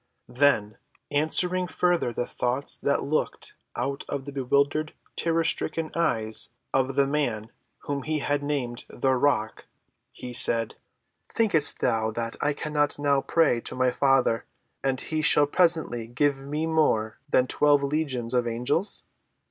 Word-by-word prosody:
Then, 125 -5 +2 0.3
answering 180 +5 +1
further 175 -7 +1
the 120 - -2
thoughts 125 +4 -1
that 140 - 0
looked 155 +2 -2 0.2
out 140 0 -3
of 140 -2 -4
the 140 - -6
bewildered, 140 +3 0 0.2
terror‐stricken 165 -1 -1
eyes 110 -10 0 0.2
of 135 0 +1
the 140 0 +4
man 120 -7 -2 0.3
whom 140 -1 -3
he 155 +2 -2
had 145 0 -1
named 135 -5 -3
"The 130 +1 0
Rock," 125 -4 0 0.4
he 125 -1 -8
said: 115 -2 +3 0.6
"Thinkest 195 -10 +2
thou 110 -2 +1
that 115 0 -4
I 150 - +1
cannot 145 0 -1
now 140 -1 +2
pray 155 -7 +2
to - - -4
my 130 0 +2
Father, 135 -4 +2 0.4
and 135 -1 0
he 155 +2 -2
shall 150 -1 +5
presently 155 -8 +1
give 135 +2 0
me 150 +2 -2
more 150 -9 +1
than 130 - +3
twelve 145 +2 +3
legions 140 -5 -2
of 125 -1 +1
angels? 125 - -1
140 Hz, 140 wpm, -26 LUFS, 125-150 Hz, 0.6 s, shall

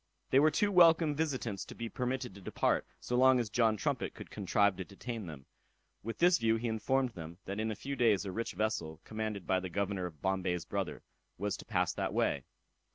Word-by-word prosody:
They 135 - +6
were 155 +2 +6
too 205 +7 +1
welcome 165 -4 +6
visitants 130 -10 -2
to - - -10
be 115 - -4
permitted 125 +1 -3
to 100 - -12
depart, - - 0
so 125 - -3
long 130 0 +6
as 115 -4 -2
John 115 -2 +3
Trumpet - - -2
could - - -10
contrive 100 0 +2
to 95 - -3
detain 110 +2 -6
them. 70 -5 -9 0.6
With 115 +2 -5
this 175 +1 +5
view 115 0 +3
he 115 +1 -2
informed 125 +4 +1
them, 85 -3 -9
that 100 +2 -4
in 110 +1 0
a 110 - -2
few 140 +6 -5
days 110 -6 +3
a 95 - -3
rich 115 +4 -3
vessel, 90 -6 -2
commanded 110 -3 -4
by 95 - +2
the 95 0 -5
Governor 100 0 -1
of 80 -4 -12
Bombay's 90 -1 -1
brother, - - -3 0.3
was 100 +1 -1
to - - -11
pass - - 0
that - - -2
way. - - +1
110 Hz, 215 wpm, -33 LUFS, 95-125 Hz, 0.6 s, They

